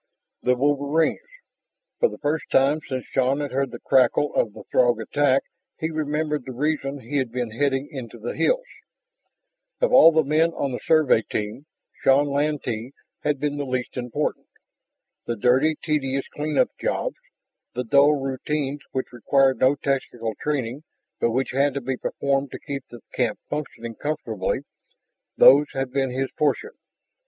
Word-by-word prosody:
The 125 - +2
wolverines! 145 - +1 0.7
For 480 - +4
the - - -9
first 150 +2 -1
time 140 +3 +3
since 130 -2 -3
Shann 135 +2 +2
had 145 -2 -3
heard 135 +1 0
the - - -8
crackle 135 +3 +3
of 110 - +1
the - - -11
Throg 120 -2 +3
attack 135 +4 +2 0.3
he 160 +1 -2
remembered 150 -1 -1
the 130 0 -7
reason 145 +1 -1
he 140 +5 -3
had 130 -4 -1
been 120 -2 -3
heading 135 +3 0
into 120 -4 -7
the 115 +2 -5
hills. - - +1 1.1
Of - - +1
all 165 - +9
the 160 -1 +3
men 155 +4 +2
on 140 -3 -2
the 125 - -4
Survey 155 -8 +4
team, 110 +7 -5 0.3
Shann 135 +2 +5
Lantee 140 -4 -2 0.3
had 145 -2 0
been 145 0 -1
the 145 - -2
least 130 -2 -3
important. 125 -2 -3 0.8
The 120 - -1
dirty, 130 +8 +3
tedious 135 -3 -1
clean 150 +1 -3
up 255 0 +3
jobs, - - -2 0.6
the 125 - -1
dull 140 +4 +5
routines 140 +1 -2
which 130 -1 -3
required 135 +1 +2
no 130 +2 +4
technical 125 -5 -2
training 135 -3 -2 0.4
but - - +2
which 130 +3 -1
had 140 +1 +1
to 140 - -2
be 130 +1 -2
performed 140 +2 -1
to - - -6
keep 140 -3 -5
the 120 - -12
camp 120 -4 0
functioning 125 -6 -5
comfortably, 115 -8 -2 0.8
those 145 +2 +8
had 135 -1 -2
been 135 -1 0
his 130 +1 -2
portion. 150 - 0
135 Hz, 160 wpm, -24 LUFS, 125-150 Hz, 1.1 s, all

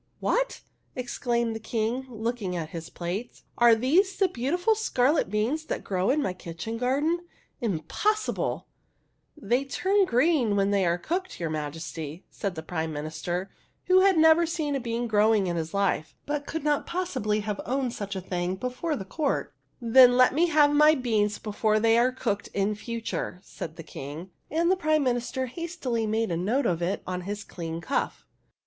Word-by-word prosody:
" - - -41
What? - - 0 0.2
" - - -42
exclaimed 235 -2 -1
the - - -4
King, 230 +4 -2
looking 225 -5 -3
at 160 -3 -3
his 165 -1 -6
plate. 185 +7 -5 0.2
"Are 235 -1 +7
these 330 - +2
the 390 - +3
beautiful 350 - +1
scarlet 300 - +1
beans 230 +10 0
that - - -3
grow 185 -1 0
in 290 +3 +2
my 185 - -1
kitchen 180 +6 -6
garden? 285 +7 +1 0.4
Im 195 -10 -1
possible! 425 - -1 0.4
" - - -46
"They 250 0 +1
turn 385 +8 +2
green 255 - +2
when 200 0 +2
they 195 -3 +2
are 170 +1 +2
cooked, 360 - -3
your 165 -2 -2
Majesty," 155 +1 -5
said 195 -4 -3
the 160 - -6
Prime 160 0 -3
Minister, 155 +5 -4 0.3
who 370 0 +5
had 380 -2 +5
never 320 +1 +6
seen 310 -3 -2
a - - 0
bean 235 -1 -2
growing 215 -2 +3
in 175 -1 -1
his 160 -1 -3
life 195 -5 0
but 290 0 -3
could 320 -2 -4
not 295 -1 +1
possibly 255 - -1
have 210 -1 -3
owned 255 -1 -1
such 200 -1 -5
a 190 - -3
thing 180 0 -2
before 255 - -3
the 195 - -6
court. 285 +7 -1 0.3
THE 240 - -9
HUNDREDTH 225 - -3
PRINCESS 260 -1 +10
S9 - - +1
"Then 245 - +1
let 255 0 +6
me 335 +5 +3
have 295 -3 +4
my 300 +1 +6
beans 215 -6 +1
before 215 0 0
they 225 +1 +4
are 250 +2 +3
cooked, 220 -5 -2
in 200 +1 +1
future," 225 -4 -4
said 160 -1 -7
the 165 - -9
King; 155 +4 -8 0.2
and 335 +3 +2
the - - +4
Prime 310 -4 +2
Minister 250 +1 -1
hastily 255 -6 -3
made 220 -2 0
a 165 - 0
note 230 +10 0
of 175 -5 0
it 185 +4 -1
on 180 0 -3
his 205 +3 -5
clean 165 -1 -6
cuff. 275 - -2
230 Hz, 195 wpm, -27 LUFS, 190-290 Hz, 0.4 s, PRINCESS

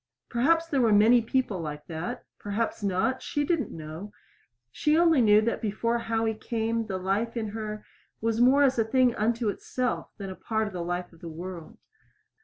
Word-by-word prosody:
Perhaps 325 +8 +3
there 280 -5 +1
were 230 -2 +4
many 220 +4 +6
people 230 -4 -1
like 150 -2 -6
that 160 +1 -5
perhaps 215 +3 -2
not; 200 +6 0
she 290 - -1
did 335 +2 +1
not 250 - -3
know. 160 +6 -8 0.6
She 300 +1 +2
only 330 -5 +5
knew 210 -2 +6
that 230 +2 -1
before 230 +2 0
Howie 225 -1 0
came 225 0 -2
the 190 - -2
life 200 +6 -1
in 220 -2 -2
her 215 0 -5 0.3
was 225 +1 0
more 270 +4 +6
as 265 -3 +3
a - - +5
thing 250 +2 +3
unto 230 +1 0
itself 250 +4 -2
than 195 -2 -6
a - - -7
part 220 +2 -1
of 210 - -6
the 180 - -4
life 175 +1 -4
of 165 - -18
the 170 - -8
world. 175 +5 -8
220 Hz, 195 wpm, -27 LUFS, 195-240 Hz, 0.6 s, many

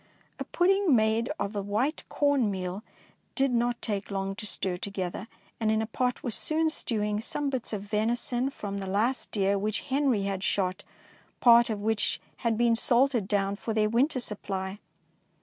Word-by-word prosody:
A - - -2
pudding 380 -4 +3
made 220 +1 +2
of 200 +1 -2
the 205 - -2
white 215 +10 -1
corn 285 -6 +2
meal 185 0 -4 0.5
did 270 -1 +2
not 240 0 +1
take 200 -3 -2
long 195 -1 -2
to 215 -1 -4
stir 185 -2 -1
to 200 - -4
gether, 190 +1 -4 0.3
and 220 -1 +1
in 220 - +2
a 220 - 0
pot 250 +3 -2
was 240 - -2
soon 315 +5 +1
stewing 210 -7 -1
some 280 +4 -2
bits 260 -3 -2
of 205 -3 -3
venison 240 +4 0
from 200 -6 -5
the 195 - -5
last 220 +7 0
deer 200 -1 +1
which 215 +1 -1
Henry 265 -6 +1
had 195 -1 -2
shot, 190 0 0 0.6
part 235 -1 +6
of 210 -2 -2
which 220 0 +1 0.2
had 230 -3 0
been 235 0 +3
salted 240 -2 +2
down 200 -1 +1
for 220 +2 -4
their 215 -1 +3
winter 255 +5 +2
supply. 195 -3 -4
220 Hz, 180 wpm, -28 LUFS, 200-245 Hz, 0.6 s, part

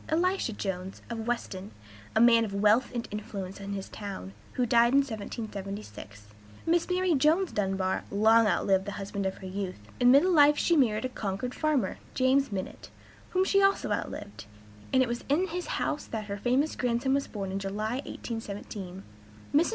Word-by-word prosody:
Elisha 350 -3 +1
Jones, 190 -2 -5
of 225 -1 -4
Weston, 205 -5 -3 0.5
a - - +4
man 230 0 +6
of 200 -3 -4
wealth 210 +5 +4
and 235 - -3
influence 200 -2 -6
in 200 0 -5
his 195 -1 -5
town, 195 - -7 0.2
who 250 - +1
died 235 +1 +4
in 280 - +6
1776. 200 - -7 0.4
Mrs. 335 +1 +2
Mary 365 -1 +2
(Jones) 315 +6 +3
Dunbar 190 -2 -1
long 220 +2 +5
outlived 195 -1 +2
the 205 - -4
husband 200 0 -3
of 190 - -4
her 190 - -10
youth; 190 0 -4 0.2
in 245 - +6
middle 285 +8 +6
life 295 -1 +6
she 340 - +3
married 240 -5 +2
a - - -1
Concord 215 +1 -3
farmer, 290 -11 0 0.2
Jonas 270 +2 +3
Minott, 190 -2 -5 0.4
whom 375 +1 +2
she 395 +1 +3
also 390 0 +2
outlived; 205 - -4 0.5
and 260 -1 +5
it - - -1
was 240 +1 -3
in 345 +6 +2
his 355 +2 -4
house 295 - -1
that 220 -2 -5
her 200 -1 -4
famous 255 +8 +1
grandson 250 +2 0
was 275 0 0
born 195 -3 -5
in 195 - -2
July, 210 +4 -2
1817. 200 -4 -6 0.5
Mrs. 310 +4 +4
225 Hz, 175 wpm, -29 LUFS, 200-275 Hz, 0.5 s, man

